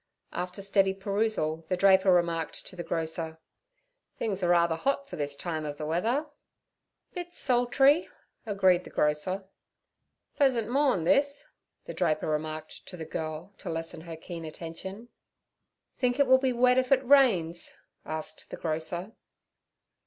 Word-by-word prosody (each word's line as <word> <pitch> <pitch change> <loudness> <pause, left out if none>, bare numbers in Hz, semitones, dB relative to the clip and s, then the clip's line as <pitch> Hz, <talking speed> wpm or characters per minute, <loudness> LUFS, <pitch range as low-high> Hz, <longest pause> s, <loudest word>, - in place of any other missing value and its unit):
After 180 +2 -4
steady 195 -1 +2
perusal 195 -5 -1
the 185 - +1
draper 190 0 +5
remarked 170 -2 0
to - - -11
the 175 - -5
grocer: 160 -1 -3 0.8
'Things 200 -4 -1
are 175 - +1
rather 170 -1 +4
hot 275 +8 -1
for - - -7
this 145 -1 -2
time 160 0 -4
of 145 -1 -5
the 150 - -4
weather.' 225 - 0 0.9
'Bit 350 -1 -6
sultry' 270 +5 +3 0.3
agreed 190 -4 +3
the - - -11
grocer. 150 +6 0 0.9
'Pleasant 255 -7 +2
morn' 265 - +2
this' 280 - +2 0.4
the - - -6
draper 155 -4 0
remarked 155 0 -4
to 180 - -8
the 160 - -6
girl 160 +4 -5
to - - -6
lessen 165 0 -4
her 165 -1 -8
keen 165 0 -8
attention. 175 +8 -7 0.9
'Think 245 -1 +1
it 280 - +6
will 260 0 +6
be 260 -1 +1
wet 250 +1 +4
if 255 0 -2
it 265 -1 +4
rains?' 200 -12 +3 0.3
asked 155 0 -5
the - - -7
grocer. 165 +4 -3
185 Hz, 145 wpm, -28 LUFS, 160-245 Hz, 0.9 s, it